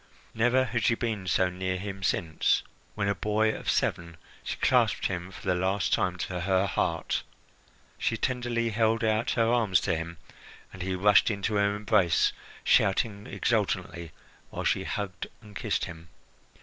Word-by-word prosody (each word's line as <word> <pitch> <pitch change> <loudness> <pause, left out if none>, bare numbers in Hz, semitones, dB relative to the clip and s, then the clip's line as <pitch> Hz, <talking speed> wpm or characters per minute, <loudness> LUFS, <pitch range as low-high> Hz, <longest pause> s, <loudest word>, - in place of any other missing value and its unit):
Never 120 +3 +3
had 120 -3 -2
she 115 - +3
been 110 -5 -3
so 90 0 +2
near 95 0 -2
him 95 0 -6
since, 85 -4 +1 0.3
when 100 -1 -1
a 100 - +2
boy 105 +3 +1
of - - -5
seven, 85 -1 -1 0.3
she - - -4
clasped - - +2
him 90 0 -2
for 95 - -12
the 95 - +2
last 95 0 0
time 90 0 +1
to 90 0 -4
her 95 +1 +2
heart. 85 -4 -1 0.8
She - - 0
tenderly 120 -2 -1
held 110 +1 +1
out 110 +1 +1
her 115 - +4
arms 115 -7 +3
to - - 0
him, 80 +1 -5 0.6
and 95 - -8
he 95 +1 -2
rushed 105 +4 +5
into 105 0 -2
her 100 0 +2
embrace, 105 -6 +2 0.3
shouting 100 +1 +2
exultantly 85 -2 -1 0.4
while - - -5
she - - +1
hugged 95 -3 -4
and 105 -2 -15
kissed - - -1
him. 80 0 -10
100 Hz, 160 wpm, -28 LUFS, 90-110 Hz, 0.8 s, rushed